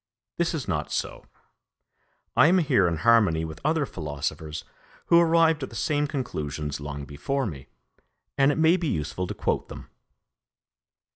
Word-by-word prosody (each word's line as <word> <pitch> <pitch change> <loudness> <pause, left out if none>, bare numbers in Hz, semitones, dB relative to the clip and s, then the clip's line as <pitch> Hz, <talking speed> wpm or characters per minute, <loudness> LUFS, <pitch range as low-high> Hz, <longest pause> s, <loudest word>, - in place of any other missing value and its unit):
This 170 -1 0
is 135 -10 -4
not 75 -5 -2
so. - - -4 1.1
I - - +6
am 180 +3 +4
here 140 - +3
in 85 -1 -1
harmony 85 -4 +3
with 80 -1 -9
other 155 0 +1
philosophers 75 - -5 0.4
who 170 - +6
arrived 165 -2 +4
at 130 - -4
the - - -12
same 145 -1 0
conclusions 75 - -4
long 70 0 -6
before 75 - -2
me, 70 -8 -7 0.7
and 135 +1 +4
it - - -2
may 160 +3 +4
be 170 -3 -2
useful 80 - -2
to - - -5
quote - - -1
them. - - -10
105 Hz, 155 wpm, -26 LUFS, -, 1.1 s, I